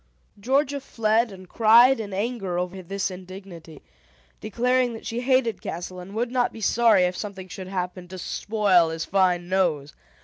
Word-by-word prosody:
Georgia 275 +5 +1
fled, 225 -2 +1
and 185 -1 -12
cried 235 +5 +5
in 205 -2 -5
anger 195 -3 -3
over 180 +1 -3
this 195 +2 -3
indignity, 180 -4 -11 0.6
declaring 245 +3 0
that 225 - -10
she 235 +1 -3
hated 255 -3 +1
Castle 180 +2 -6
and 190 +3 -10
would 235 +2 -1
not 250 -1 +1
be - - -11
sorry 220 -2 +4
if 180 0 0
something 195 -2 -7
should 185 0 -8
happen 180 -1 -4
to 185 +1 -9
spoil 190 -3 +2
his 160 0 -4
fine 180 -2 +1
nose. 170 -6 0
195 Hz, 165 wpm, -24 LUFS, 180-230 Hz, 0.6 s, cried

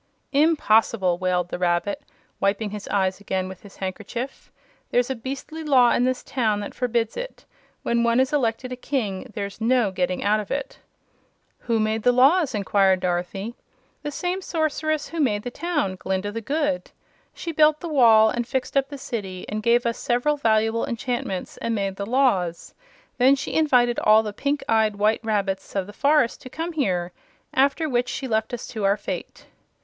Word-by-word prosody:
"Impossible!" 225 - +3
wailed 180 -1 0
the - - -4
Rabbit, 175 +3 0 0.4
wiping 200 +1 0
his 210 -1 -7
eyes 190 -1 0
again 190 -2 -2
with 190 -1 -10
his 200 - -14
handkerchief. 215 +7 -6 0.4
"There's 245 +1 +1
a - - -1
beastly 275 +6 -6
law 255 -5 +5
in 245 - +2
this 255 0 -1
town 220 -5 0
that 205 - -6
forbids 235 -2 -1
it. - - -7 0.4
When 235 0 +1
one 235 +1 +3
is 260 +2 +1
elected 250 -2 0
a - - -3
King, 245 -4 -3
there's 200 0 -5
no 235 -3 +2
getting 185 -1 -1
out 210 +1 +3
of 210 - -6
it." 275 -1 -4 0.8
"Who 230 -2 0
made 215 +1 0
the 245 - +4
laws?" 275 +4 +4
inquired 195 -2 +2
Dorothy. 180 +5 -2 0.5
"The 295 - -4
same 360 +5 -2
Sorceress 310 -3 -1
who 335 - -5
made 210 -8 +1
the 245 - -5
town 295 - -2
Glinda 190 +2 -2
the 230 +2 -4
Good. 290 +2 -1 0.4
She 335 - -5
built 305 -1 +4
the 345 - -5
wall, 225 -7 +6
and 240 -1 -2
fixed 260 +2 -3
up 275 0 +2
the 285 - -7
City, 205 -9 -5
and 215 +1 -3
gave 235 +2 +3
us 235 -1 -1
several 245 +5 +1
valuable 225 -3 +1
enchantments, 235 -5 -3
and 230 -1 -2
made 195 -2 -2
the 200 - -4
laws. 205 -10 +1 0.5
Then 260 +3 +6
she 275 - -5
invited 250 -6 +3
all 215 +1 +5
the 210 -1 -5
pink 285 +6 -1
eyed 220 -2 +2
white 215 +3 +1
rabbits 200 -4 -2
of 195 -2 0
the 205 - -11
forest 280 0 +2
to 255 - -10
come 330 +5 -4
here, 180 - -1 0.4
after 280 +4 +2
which 245 -2 0
she 265 +2 -4
left 220 -2 0
us 245 - -5
to 215 - -5
our 200 +1 +3
fate." - - -6
230 Hz, 185 wpm, -24 LUFS, 200-270 Hz, 0.8 s, wall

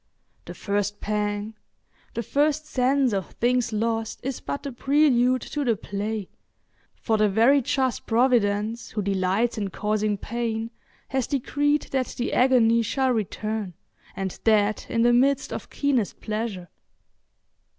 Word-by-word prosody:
The - - -8
first 205 0 -2
pang—the 210 +2 -5
first 295 +5 +1
sense 265 -3 +1
of 195 -3 -3
things 245 0 +1
lost 225 +1 -1
is 270 -1 -3
but 280 - -5
the 280 - -4
prelude 255 -2 +3
to 295 - -3
the 235 -4 +2
play, 205 0 -4 0.7
for 220 -2 0
the 210 -1 +3
very 235 +8 +4
just 260 0 -1
Providence 225 -2 +1
who 210 - -3
delights 195 +4 0
in 200 -2 -2
causing 210 +1 -1
pain 230 +1 -3 0.4
has 265 -2 -1
decreed 290 +2 0
that 260 -2 -1
the 245 - -2
agony 235 -3 +4
shall 260 +3 0
return, 215 -3 -3 0.4
and 190 -1 -4
that 215 -1 +2
in 230 - +1
the 240 0 +5
midst 275 +3 +2
of - - -6
keenest 265 -8 0
pleasure. 215 -5 -4
230 Hz, 135 wpm, -25 LUFS, 210-255 Hz, 0.7 s, the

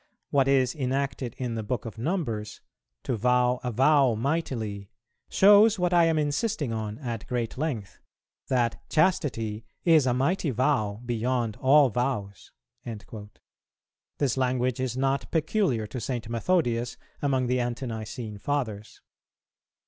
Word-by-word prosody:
What 135 -2 +3
is 130 -2 +3
enacted 135 -3 -2
in 125 -2 -3
the 115 - -3
Book 110 +2 -3
of 110 -1 -8
Numbers, 115 - -3 0.4
'to 125 - -1
vow 125 +2 +2
a 125 - -1
vow 135 0 +4
mightily,' 115 -7 -2 0.4
shows 205 +2 +6
what 180 -1 0
I 170 -1 +6
am 165 -1 +2
insisting 150 - -1
on 110 -1 -4
at 120 -6 -5
great 120 -2 -2
length, 125 -9 -4 0.5
that 120 -2 0
Chastity 125 - +1 0.2
is 160 -6 +5
a 125 - +3
mighty 150 +5 +1
vow 125 -5 0
beyond 120 -1 -1
all 140 +1 +5
vows."[409:1] 105 -2 -6 0.9
This 135 -5 0
language 125 -1 0
is 130 -1 -2
not 135 +1 0
peculiar 155 - 0
to 120 +3 -6
St. 120 -1 -3
Methodius 120 -1 0 0.2
among 135 -3 +1
the 125 +1 +1
Ante 120 +2 -2
nicene 110 -2 -6
Fathers. 110 -6 -3
125 Hz, 135 wpm, -27 LUFS, 115-145 Hz, 0.9 s, shows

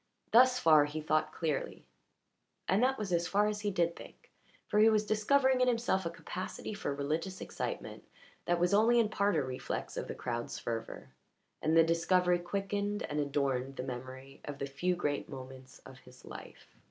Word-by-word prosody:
Thus 250 +2 +6
far 155 -8 +6
he 150 +2 -5
thought 155 0 0
clearly, 155 -4 -3 0.8
and 195 - +3
that 265 +1 +2
was 200 -4 -3
as 170 0 +1
far 205 +3 +2
as 210 -1 -2
he 205 - 0
did 170 -3 0
think, - - -14 0.4
for 210 - +1
he 220 +1 +7
was 215 -1 +2
discovering 260 +5 +3
in 255 - +4
himself 230 -7 +1
a - - -1
capacity 185 +4 -6
for 205 - -3
religious 160 +7 -2
excitement - - -5 0.4
that 175 0 +1
was 175 +3 +2
only 230 +4 +5
in 225 -2 +2
part 200 -2 +1
a 150 - +2
reflex 130 -1 -5
of - - -3
the - - -5
crowd's 120 -1 -4
fervour, 115 -1 -5 0.5
and 160 +1 +2
the 165 - +8
discovery 175 +2 +2
quickened 200 +3 -2
and 150 - -3
adorned 135 -2 -1
the 125 - -4
memory 130 +1 -8
of 145 -1 -6
the 140 - -3
few 175 +7 -1
great 145 -4 -2
moments 130 -1 -10
of 130 0 -12
his 125 0 -17
life. - - -12
170 Hz, 185 wpm, -32 LUFS, 140-205 Hz, 0.8 s, the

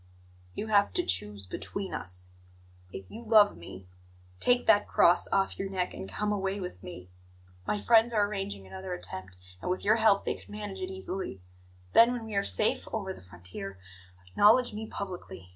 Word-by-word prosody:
"You - - -3
have 205 -2 +3
to - - +1
choose 100 +2 -1
between 195 - -5
us. 90 0 -6 0.6
If 95 - -7
you 230 - -8
love 215 -3 +5
me, 90 +2 -11 0.5
take 245 0 +3
that 205 -2 +5
cross 175 - +4
off 195 0 0
your 195 - -2
neck 185 -2 -2
and 95 +1 -7
come 210 - -1
away 195 -1 -1
with 180 - -6
me. 90 0 -10 0.6
My 210 - 0
friends 230 +2 +5
are 210 -3 +3
arranging 195 - -5
another 190 - -6
attempt, 95 - -8 0.2
and - - -3
with 185 - -2
your 215 +2 +5
help 215 -3 +4
they - - 0
could - - -14
manage 205 -2 -6
it 185 - -3
easily. 190 - -5 0.5
Then, 235 +2 +7
when 240 -2 -5
we 220 - -7
are 200 - +2
safe 215 - +1
over 195 -4 -3
the - - -13
frontier, 90 +2 -8 0.5
acknowledge 215 - +4
me 220 +1 -5
publicly. 180 - -7
195 Hz, 180 wpm, -29 LUFS, -, 0.6 s, Then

